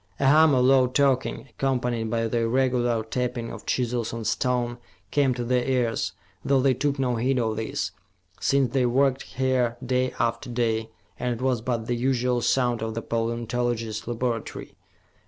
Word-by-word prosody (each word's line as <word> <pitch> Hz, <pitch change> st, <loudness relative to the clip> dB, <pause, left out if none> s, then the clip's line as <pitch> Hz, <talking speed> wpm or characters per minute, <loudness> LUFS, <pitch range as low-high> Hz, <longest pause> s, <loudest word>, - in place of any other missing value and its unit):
A 140 Hz, -, +1 dB
hum 150 Hz, +1 st, +6 dB
of 125 Hz, -1 st, +3 dB
low 130 Hz, -1 st, +5 dB
talking, 135 Hz, 0 st, +1 dB
accompanied 125 Hz, -4 st, -1 dB
by 115 Hz, 0 st, 0 dB
the 115 Hz, +1 st, 0 dB
irregular 120 Hz, -1 st, +1 dB
tapping 120 Hz, 0 st, -3 dB
of -, -, -10 dB
chisels 120 Hz, -2 st, -1 dB
on 115 Hz, -1 st, -5 dB
stone, 120 Hz, -1 st, 0 dB, 0.3 s
came 140 Hz, -2 st, +3 dB
to 120 Hz, -, -3 dB
their 125 Hz, +1 st, +1 dB
ears, 120 Hz, -9 st, 0 dB, 0.3 s
though 135 Hz, -1 st, +3 dB
they 130 Hz, 0 st, +3 dB
took 140 Hz, +3 st, -1 dB
no 125 Hz, -3 st, 0 dB
heed 130 Hz, +3 st, +1 dB
of 110 Hz, -3 st, 0 dB
this, 105 Hz, -3 st, -2 dB, 0.5 s
since 135 Hz, -3 st, +2 dB
they 130 Hz, -2 st, +3 dB
worked 135 Hz, +2 st, +2 dB
here 125 Hz, -2 st, 0 dB
day 130 Hz, 0 st, +1 dB
after 120 Hz, +1 st, -1 dB
day, 115 Hz, -2 st, 0 dB, 0.3 s
and 125 Hz, -1 st, -1 dB
it 115 Hz, -, -9 dB
was 130 Hz, -4 st, +1 dB
but 115 Hz, -1 st, -2 dB
the 120 Hz, -, -1 dB
usual 125 Hz, 0 st, +1 dB
sound 120 Hz, -2 st, +1 dB
of 110 Hz, 0 st, -3 dB
the 115 Hz, -, -3 dB
paleontologists' 115 Hz, -1 st, -2 dB
laboratory. 120 Hz, -1 st, -3 dB
125 Hz, 170 wpm, -25 LUFS, 115-130 Hz, 0.5 s, hum